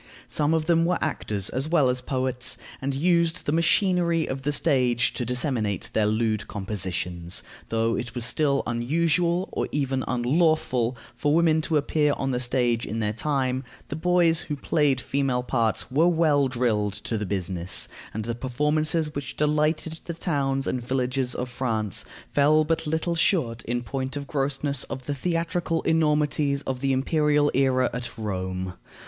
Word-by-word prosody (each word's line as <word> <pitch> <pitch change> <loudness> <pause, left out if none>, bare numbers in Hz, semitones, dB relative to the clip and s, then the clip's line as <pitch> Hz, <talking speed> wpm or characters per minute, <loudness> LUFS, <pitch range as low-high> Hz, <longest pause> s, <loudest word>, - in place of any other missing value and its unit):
Some 150 +1 +1
of 160 -1 0
them 165 0 +3
were 175 +1 +2
actors 105 -10 -1
as 135 +4 -2
well 155 -6 +4
as 125 0 0
poets, 130 -1 -2 0.2
and 135 0 -2
used 170 +3 +2
the - - 0
machinery 170 0 +2
of 135 0 -4
the 145 +2 0
stage 130 -5 +2
to 125 - -3
disseminate 120 - -2
their 110 -1 +2
lewd 110 -1 0
compositions. 90 -4 -2 0.3
Though 115 0 +1
it 120 0 -5
was 120 -2 -1
still 140 +2 +1
unusual, 170 - +1
or - - -2
even 135 -2 -1
unlawful, 125 -2 +1 0.2
for 145 +1 +1
women 160 -1 +4
to 155 0 +1
appear 150 0 +2
on 135 0 -1
the 125 - 0
stage 120 -2 +1
in 110 - -4
their 105 -2 0
time, 130 +1 -1 0.3
the - - -3
boys 170 0 +3
who 150 - -4
played 145 -2 +1
female 135 -2 0
parts 115 -1 0
were 155 +6 +4
well 155 -5 +3
drilled 115 -5 0
to 115 - -2
the 105 - -1
business, 90 -2 0 0.2
and 110 0 -4
the 115 - -2
performances 150 +5 0
which 140 -1 -6
delighted 155 +2 +1
the 170 - -5
towns 140 -5 -1
and 125 - -1
villages 125 0 0
of 125 - -3
France 115 -5 -2 0.3
fell 150 +2 +4
but 160 0 -1
little 160 +2 0
short, 150 - +1
in 120 +1 -2
point 130 +2 -4
of 140 - -5
grossness, 140 0 -1
of 130 -1 -7
the 145 - -2
theatrical 165 +2 -1
enormities 150 -3 +1
of 130 -1 -3
the 135 +1 0
imperial 145 +2 +2
era 130 -1 +3
at 125 0 -5
Rome. 95 -3 -3
135 Hz, 165 wpm, -25 LUFS, 120-155 Hz, 0.3 s, well